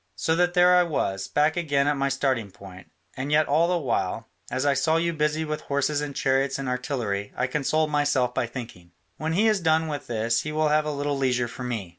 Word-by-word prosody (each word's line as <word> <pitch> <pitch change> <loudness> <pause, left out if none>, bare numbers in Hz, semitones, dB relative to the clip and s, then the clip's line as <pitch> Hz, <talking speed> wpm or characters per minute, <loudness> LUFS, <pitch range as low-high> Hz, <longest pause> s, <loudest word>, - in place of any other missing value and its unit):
So 160 - 0
that 175 +1 +1
there 180 0 +6
I 180 - +6
was, 100 - -1
back 150 +2 +1
again 145 -5 +1
at 145 - +2
my 140 0 0
starting 130 -6 -1
point, 95 -1 -13 0.3
and 135 +2 -4
yet 150 +1 +4
all 160 +4 +3
the 180 0 +1
while, 115 - -2 0.2
as 130 +3 -2
I 140 - +4
saw 155 +4 +2
you 170 0 0
busy 155 0 0
with 150 0 -4
horses 145 +1 -1
and 145 -2 -5
chariots 135 0 +1
and 135 -1 -4
artillery, 125 -6 -2
I 125 - +1
consoled 150 +3 0
myself 145 -4 +1
by 120 - -1
thinking, 110 -8 -9 0.2
'when 160 +1 -2
he 210 +6 +3
is 215 -2 +3
done 160 -1 +2
with 145 -3 -5
this 115 0 0
he 150 - -5
will 155 0 +1
have 155 0 +2
a 150 - -1
little 145 -1 -2
leisure 125 -2 +1
for 125 - -8
me.' 115 -7 -4
140 Hz, 230 wpm, -25 LUFS, 125-155 Hz, 0.3 s, there